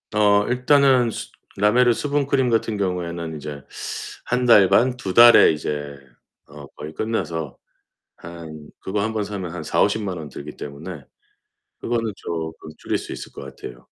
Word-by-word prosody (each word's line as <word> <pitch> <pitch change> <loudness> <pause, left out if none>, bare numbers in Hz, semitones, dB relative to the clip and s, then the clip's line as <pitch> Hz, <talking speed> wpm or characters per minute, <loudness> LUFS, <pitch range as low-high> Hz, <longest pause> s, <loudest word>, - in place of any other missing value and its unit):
어 105 -1 +4
일단은 125 -1 +4
수 - - -7 0.3
라메르 120 +5 +4
수분크림 140 -1 0
같은 115 -2 0
경우에는 85 -4 -3
이제 75 -1 -7 0.6
1 125 +2 0
달 105 -5 +7
반, 125 +1 +3
2 95 -6 -4
달에 120 +2 +8
이제 75 -2 -4 0.5
어 75 0 -11
거의 75 +1 -9
끝나서 80 - -3 0.6
한 80 -3 -10
그거 100 +2 -2
1 110 +1 -2
번 110 -1 -1
사면 95 -5 -5
한 90 - -5
400,000-500,000 100 +3 0
원 75 -2 -7
들기 70 +2 -9
때문에 75 +2 -8 0.8
그거는 115 -2 -1
쪼끔 80 -3 -6
줄일 - - -2
수 - - -9
있을 - - -8
것 - - -10
같아요. - - -10
100 Hz, 255 characters per minute, -22 LUFS, 80-115 Hz, 0.8 s, 달에